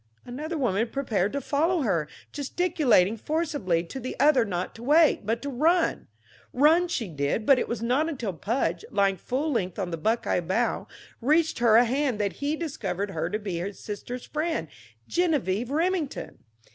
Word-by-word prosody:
Another 300 +7 -5
woman 230 -5 +1
prepared 220 -8 -1
to 280 - 0
follow 320 +5 +1
her, 170 - 0 0.2
gesticulating 285 - +2
forcibly 290 - -1
to 175 +10 -7
the 255 0 -6
other 285 -4 +5
not 180 -3 -3
to 225 - -12
wait, 295 -4 +4
but 230 +1 -1
to 285 - -3
run. 325 +7 +1 0.5
Run 320 +7 +4
she 265 - -2
did, 150 +6 -2
but 275 -3 +6
it - - -1
was 235 -1 -3
not 265 +7 +1
until 240 - -3
Pudge, 175 -2 -1
lying 200 -2 +2
full 275 - -2
length 185 -8 -1
on 185 -4 -3
the 165 - -3
buckeye 220 +4 0
bough, 190 +8 -1 0.3
reached 310 +5 +2
her 235 -2 +5
a 240 +2 +7
hand 260 -1 0
that 200 -2 0
he 290 +2 0
discovered 205 - -3
her 165 -1 -2
to 210 - -1
be 200 -5 -4
his 190 +2 -5
sister's 240 +4 -6
friend, 305 - -2 0.4
Geneviève 250 - 0
Remington. 325 0 -1
245 Hz, 170 wpm, -26 LUFS, 195-300 Hz, 0.5 s, a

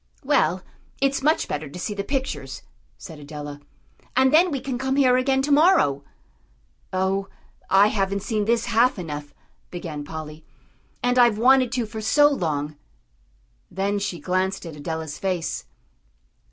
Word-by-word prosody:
"Well, 185 +1 +2 0.4
it's 275 0 +1
much 310 +3 +2
better 150 0 -4
to 145 - -9
see 180 +4 -3
the 200 -1 -3
pictures," 265 +4 -4 0.3
said 160 -4 -10
Adela. 145 0 -8 0.6
"And 265 +2 +4
then 345 +4 +6
we 280 -4 -2
can 255 -1 -4
come 265 +1 -1
here 260 -3 +4
again 265 +1 +2
to 290 - -1
morrow." 285 - +4 0.9
"Oh, 190 +1 0 0.4
I 200 +2 +6
haven't 195 -1 -1
seen 215 -3 -1
this 230 +1 +1
half 235 +2 +3
enough," 150 -4 -6 0.3
began 165 -4 -6
Polly, 155 0 -8 0.6
"and 245 +1 +2
I've 240 -3 +5
wanted 255 +1 +4
to 245 -3 0
for 220 0 -7
so 290 +7 +5
long." 150 - -2 0.9
Then 200 +2 -1
she 185 -4 -3
glanced 185 +4 -1
at 165 -2 -8
Adela's 160 0 -5
face. 185 -4 -2
200 Hz, 150 wpm, -23 LUFS, 160-255 Hz, 0.9 s, then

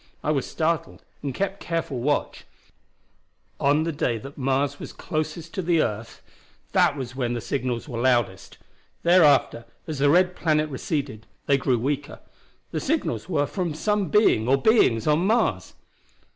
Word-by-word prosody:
I 150 - +1
was 140 -4 -1
startled, 165 0 -2 0.2
and 140 - -3
kept 195 +7 -3
careful 165 -6 -3
watch. 145 +4 -1 1.1
On 145 +3 +3
the 165 - -1
day 125 -6 -1
that 135 +6 -10
Mars 140 +1 -1
was - - -8
closest 160 +2 -4
the 170 -1 +2
earth 110 +2 -5 0.5
the 125 -3 0
signals 125 0 -3
were 120 -4 -4
loudest. 120 -7 0 0.5
Thereafter, 155 -9 +4 0.2
as 155 -3 -5
the 145 +1 +4
red 180 +3 +3
planet 155 -2 +1
receded, 130 -5 -4 0.2
they 140 - +3
grew 130 -2 +1
weaker. 140 +5 -3 0.5
The - - -2
signals 310 - -2
were 145 -5 +1
from 175 -2 -3
some 205 +2 0
being 145 - +3
or 135 +2 +3
beings 135 - +3
on 150 0 +3
Mars! 215 - 0
145 Hz, 145 wpm, -24 LUFS, 130-165 Hz, 1.1 s, Thereafter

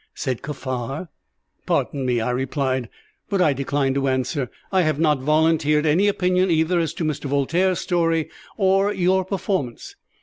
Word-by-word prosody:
said 130 -4 -3
Kaffar. 135 +2 -5 0.6
"Pardon 135 -3 0
me," 120 -2 +1
I 110 - -1
replied, 130 -1 -1 0.4
"but 195 - 0
I 160 -5 +4
decline 140 0 0
to 135 0 0
answer. 130 0 -1 0.2
I 190 -1 +3
have 155 -3 0
not 150 -3 +3
volunteered 155 +1 +2
any 170 +7 +3
opinion 185 -1 +2
either 165 +2 +2
as 165 -1 -2
to 175 - -3
Mr. 150 -2 -2
Voltaire's 165 +7 +1
story 165 -3 +1 0.3
or 195 0 +3
your 190 -1 +2
performance. 185 - -3
155 Hz, 155 wpm, -22 LUFS, 135-180 Hz, 0.6 s, I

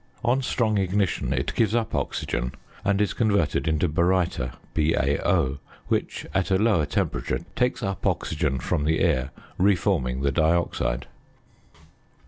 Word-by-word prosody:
On 125 +3 +3
strong 110 -5 +1
ignition 95 -1 0
it - - -1
gives 115 0 +2
up 115 -2 -1
oxygen, 60 +1 -2 0.3
and 100 0 +1
is 105 -2 +1
converted 100 - +1
into 80 +2 +2
baryta 85 -4 +1 0.2
(BaO), 75 -1 +1 0.3
which, - - -1
at 95 0 +1
a 95 - +3
lower 100 -8 +2
temperature, 75 - -1
takes 125 -1 0
up 95 -1 -2
oxygen 75 -4 0
from 75 +3 -1
the 80 0 +2
air, 65 +1 +1 0.3
re 100 +2 +5
forming 65 -6 0
the 70 - +2
dioxide. 75 -5 +1
85 Hz, 135 wpm, -25 LUFS, 70-100 Hz, 0.3 s, re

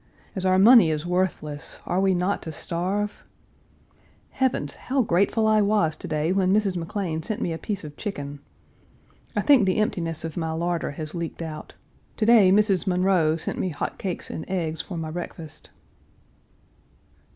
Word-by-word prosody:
As 190 -1 -1
our 185 0 +4
money 215 -2 +7
is 155 0 -2
worthless, 170 -4 -2
are 180 - 0
we 190 -1 +3
not 180 +3 0
to 160 - -6
starve? 185 +7 -3 1.1
Heavens! 255 - 0
how 265 0 -1
grateful 200 +3 +2
I 215 -1 +4
was 200 -6 +2
to - - -8
day 155 +2 0
when 190 -1 +2
Mrs. 200 -2 +2
McLean 170 -1 -3
sent 215 +7 -2
me 170 - -1
a 165 - -5
piece 205 -4 -4
of 150 -1 -9
chicken. 145 -9 -5 1.0
I - - +2
think 275 -9 +5
the 185 - +1
emptiness 170 -7 -1
of 165 0 -6
my 160 -1 -2
larder 170 +1 -1
has 155 +1 -6
leaked 170 -1 -5
out. 155 -1 -8 0.4
To 215 - +1
day 220 -5 +6
Mrs. 200 -1 +3
Munroe 180 -4 +2
sent 160 - -4
me 185 - 0
hot 145 - -4
cakes 185 -3 -4
and 160 - -5
eggs 160 -4 -2
for 180 - -7
my 160 -1 -4
breakfast. 165 -2 -8
180 Hz, 170 wpm, -25 LUFS, 160-200 Hz, 1.1 s, money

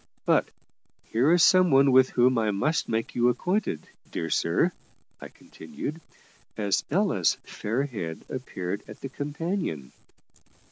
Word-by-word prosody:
But - - +3 0.6
here 125 +8 +3
is 175 0 +5
some 185 -1 +6
one 135 -1 +5
with 130 0 +6
whom 125 0 +3
I 110 -1 +1
must 130 +11 0
make 115 0 -2
you 120 0 +3
acquainted, 180 - -1 0.2
dear - - -4
sir," - - +2 0.5
I - - -7
continued, 165 -8 -8 0.6
as 100 -2 0
Ella's 170 - +2
fair 115 +6 -2
head 95 - -6
appeared 100 -7 -5
at - - -12
the 135 - -5
companion. 145 - -4
130 Hz, 135 wpm, -26 LUFS, 110-160 Hz, 0.6 s, some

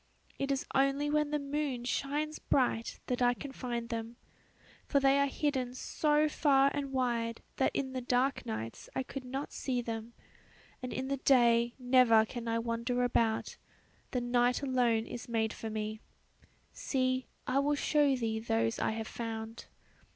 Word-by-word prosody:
It 275 0 0
is 275 - -1
only 275 +2 +2
when 300 -1 +2
the 300 - 0
moon 280 -3 -2
shines 295 +4 -1
bright 245 -3 0
that 250 0 -2
I 245 0 +4
can 285 +1 -7
find 240 -3 -4
them, 230 0 -4 0.7
for 280 - +3
they 275 0 +4
are 280 - +3
hidden 265 -3 -1
so 300 +3 +2
far 275 -2 +3
and 280 -1 -3
wide 235 -3 -1
that 265 - +3
in 265 -1 -2
the 255 - -2
dark 250 +2 +1
nights 110 +1 -5
I 265 - 0
could 265 +1 -7
not 265 +3 -5
see 255 -2 -1
them, 230 -1 -5 0.7
and 255 - -5
in 260 - -3
the 275 0 -1
day 235 -3 +4
never 245 -3 +5
can 235 +1 -6
I 230 0 +1
wander 235 +2 -1
about, 230 -2 +1 0.5
the 250 - -1
night 245 +2 +2
alone 245 -4 +2
is 240 +1 -7
made 225 -1 0
for 225 - -6
me. 215 0 -3 0.7
See, 255 -1 -1 0.2
I 260 +2 +1
will 290 +1 +2
show 290 -1 +3
thee 225 -3 -1
those 115 - 0
I - - 0
have 220 0 -4
found." 225 -1 -6
250 Hz, 165 wpm, -32 LUFS, 230-275 Hz, 0.7 s, never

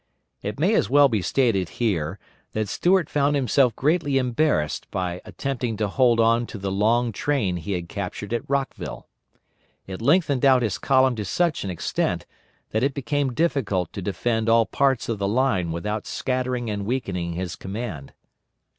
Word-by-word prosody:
It 105 +5 -5
may 185 +8 +3
as - - +2
well 140 +1 +6
be 110 -4 0
stated 100 - +1
here 95 -7 0 0.4
that 110 -1 -1
Stuart 175 - +2
found 145 0 +1
himself 130 -3 +2
greatly 145 -1 +1
embarrassed 125 - 0
by 90 -1 -3
attempting 125 -5 -3
to 105 - 0
hold 120 +2 +3
on 115 +1 +3
to - - -7
the 95 -1 -3
long 115 +4 +2
train 105 -7 0
he 85 +4 -4
had 85 -2 -3
captured 100 +3 -5
at 120 - -3
Rockville. 140 -1 -3 0.8
It 95 +2 -7
lengthened 145 0 +2
out 130 -2 +5
his 105 -4 -1
column 130 -2 +3
to 105 - -3
such 165 - 0
an 100 - -4
extent 90 - -2 0.5
that 110 - 0
it 135 +1 +1
became 140 -1 -1
difficult 130 - 0
to 100 - -5
defend 110 +4 -1
all 115 0 +5
parts 135 -1 +1
of 115 -3 -2
the 100 - 0
line 100 -7 +1
without 105 +6 -3
scattering 125 -2 -2
and 100 -2 -3
weakening 95 -9 -2
his 90 0 -4
command. 95 - -6
115 Hz, 170 wpm, -24 LUFS, 100-135 Hz, 0.8 s, well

